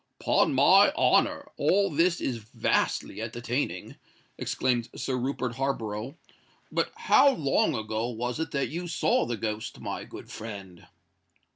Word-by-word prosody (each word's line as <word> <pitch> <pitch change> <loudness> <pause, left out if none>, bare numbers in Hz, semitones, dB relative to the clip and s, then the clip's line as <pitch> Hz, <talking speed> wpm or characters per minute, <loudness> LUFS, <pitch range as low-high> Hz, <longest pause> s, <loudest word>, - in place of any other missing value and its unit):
"'Pon - - +2
my - - +6
honour, - - +2
all 195 +6 +2
this 170 +3 +2
is 125 - -2
vastly 110 0 -1
entertaining!" 115 -4 -3 0.4
exclaimed 120 -2 -1
Sir 130 0 -2
Rupert 125 -1 -2
Harborough. 125 0 -3 0.5
"But - - 0
how 280 - +5
long 140 - +1
ago 110 +1 -2
was 120 +3 -3
it 160 - -2
that 140 -1 -1
you 175 +3 -4
saw 165 - +1
the 120 -1 -2
ghost, 110 +1 -4
my - - -5
good - - -11
friend?" 100 -5 -9
120 Hz, 135 wpm, -27 LUFS, 110-140 Hz, 0.5 s, my